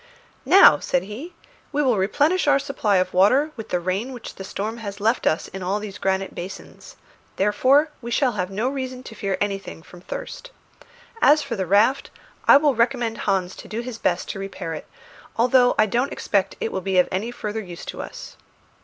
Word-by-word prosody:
"Now," 390 - +8
said 270 - 0
he, 255 - -8 0.4
"we 295 0 +1
will 245 -7 +2
replenish 295 - +1
our 285 -1 +5
supply 230 -8 0
of 185 - 0
water 255 +12 +4
with 225 -3 -8
the 180 - 0
rain 190 +9 -2
which 245 - -8
the 195 - -9
storm 210 +3 -4
has 205 -3 -7
left 225 +4 +1 0.3
in 190 - -6
all 190 +3 -1
these 205 -2 -8
granite 190 0 -1
basins; 180 +3 -9 0.4
therefore 260 +10 +3
we 235 - -6
shall 255 +1 +2
have 185 -5 -3
no 210 +5 -2
reason 260 -2 -4
to 235 - -10
fear 200 -3 -2
anything 195 -5 -4
from 175 +1 -14
thirst. - - -7 0.7
As 300 +1 +5
for 270 -4 -4
the 190 -3 -3
raft, 215 +8 +3 0.4
I - - +9
will 290 -1 +3
recommend 235 -1 0
Hans 190 -2 0
to - - -10
do 220 +4 -4
his 240 -2 -7
best - - 0
to 195 - -7
repair 195 -4 -5
it, 155 - -8 0.5
although 245 +1 +4
I 215 - +5
don't 245 +7 0
expect 195 -1 -1
it 225 - -2
will 190 - -3
be 190 0 -1
of 180 - +5
any 195 +5 -2
further 220 -2 -4
use 175 -4 -9
to - - -6
us." - - -9
215 Hz, 200 wpm, -23 LUFS, 195-255 Hz, 0.7 s, I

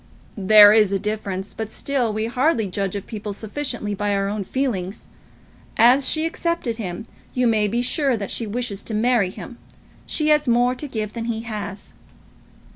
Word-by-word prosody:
"There 205 +1 +8
is 215 -3 +4
a 200 - +1
difference; 200 -2 -4
but, 220 -1 -5
still, 255 -2 -1
we 215 +1 -2
hardly 250 0 +1
judge 195 0 -3
of 200 - -5
people 210 -2 -6
sufficiently 220 0 -4
by 205 0 -1
our 195 0 0
own 205 0 -3
feelings. 210 -6 -3 0.7
As 255 +4 +5
she 315 0 +1
accepted 330 -8 -2
him, 195 -1 -5 0.3
you 250 -1 +2
may 220 -3 +3
be 235 +4 -1
sure 270 -1 +1
that 200 -2 -5
she 230 - -1
wishes 215 -2 -3
to 220 - -4
marry 225 -3 +2
him. 235 +5 -10 0.5
She 305 -1 +1
has 300 -2 +3
more 245 +1 +3
to 290 +4 -6
give 215 -5 -4
than 230 -1 -4
he 225 -1 -2
has." 210 -3 -7
220 Hz, 180 wpm, -22 LUFS, 205-250 Hz, 0.7 s, There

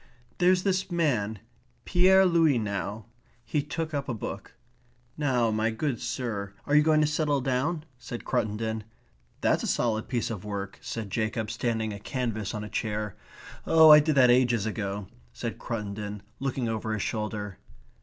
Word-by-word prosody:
"There's 180 0 +4
this 190 -1 0
man, 125 - 0 0.5
Pierre 190 +2 +5
Louys 165 -7 +4
now." 105 0 -3 0.4
He 150 - 0
took 155 +2 -4
up 140 -2 -2
a 120 - -1
book. 110 - -7 0.6
"Now 125 -6 +1
my 110 +1 +1
good 120 +2 -2
sir, 115 -5 -3
are 145 - -1
you 150 - +8
going 155 0 +4
to - - +4
settle 150 -1 +1
down?" 135 +5 -1 0.2
said 120 -1 -7
Cruttendon. 110 +1 -1 0.6
"That's - - +2
a - - -2
solid 110 -2 0
piece 120 -2 -1
of 105 -5 -5
work," 100 -1 -5
said 110 -4 -5
Jacob, 110 0 -1
standing 110 -3 -1
a 100 - -7
canvas 110 -3 -3
on 105 - -4
a - - -5
chair. 105 -2 -2 0.5
"Oh, 160 -1 +8
that - - +11
I - - +8
did 150 -1 +1
ages 120 -4 +5
ago," 105 -2 -3 0.3
said 115 -2 -5
Cruttendon, 105 -2 -4 0.2
looking 135 -2 -1
over 110 -1 -2
his 105 - -1
shoulder. 105 -3 -3
115 Hz, 165 wpm, -28 LUFS, 105-145 Hz, 0.6 s, that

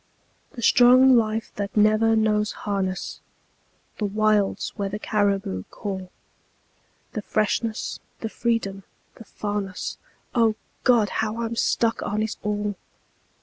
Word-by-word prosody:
The 240 -4 -7
strong 255 +3 +7
life 220 -1 +1
that 200 0 -4
never 215 +1 +4
knows 215 -1 +2
harness; 190 -3 -2 0.8
The 210 - 0
wilds 210 0 +1
where 200 -2 -2
the 205 - -4
caribou 200 - 0
call; 190 -3 -5 1.0
The 215 - -3
freshness, 215 +2 -1 0.2
the 225 - -3
freedom, 225 -5 -1 0.4
the 225 - -12
farness 205 -3 -4 0.3
O 230 -3 +3 0.3
God! 235 -5 +4
how 220 +2 -2
I'm 230 0 -3
stuck 230 0 +1
on 210 +1 -1
it 220 - -3
all. 210 0 -1
215 Hz, 120 wpm, -24 LUFS, 205-225 Hz, 1.0 s, strong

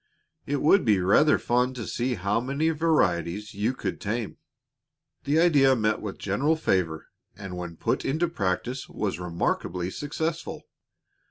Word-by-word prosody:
It 145 0 -1
would 185 +5 +5
be 105 -4 +3
rather 105 +12 +4
fun 125 +2 +1
to 115 -3 -5
see 125 +1 -1
how 100 +3 0
many 140 +6 0
varieties 105 - 0
you 110 +6 -1
could - - -4
tame." 110 0 -3 0.9
The 150 +3 +2
idea 145 -6 +5
met 110 -2 0
with 105 -3 -5
general 135 +11 +1
favor 90 - -1 0.3
and 95 -3 -7
when 90 -2 -6
put - - -1
into 160 +6 0
practice 125 - -2
was 100 -4 -3
remarkably 90 +1 -2
successful. 160 - -4
115 Hz, 145 wpm, -26 LUFS, 95-145 Hz, 0.9 s, would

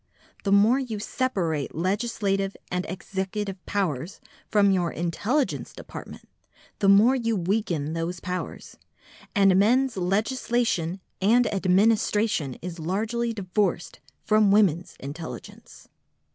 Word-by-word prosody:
The 195 - +1
more 210 +6 +5
you 245 -5 -4
separate 190 - -1
your 165 - -2
legislative 195 -1 -1
and 180 0 -2
executive 190 +1 -4
powers 175 -4 -2 0.3
from 200 -2 +4
your 175 -3 +1
intelligence 205 - -1
department - - -10 0.5
the 195 - +3
more 215 +7 +6
you 230 -3 0
weaken 175 -5 -1
those 165 +2 -3
powers, 180 +1 -6 0.6
and 195 -2 +5
men's 250 +3 +3
legislation 195 -2 0 0.2
and 235 +5 +4
administration 200 - +2
is 175 -1 -6
largely 220 +8 -1
divorced 195 -4 -1 0.2
from 215 -1 +4
women's 190 -4 +2
intelligence. 150 +4 -9
195 Hz, 110 wpm, -25 LUFS, 180-220 Hz, 0.6 s, more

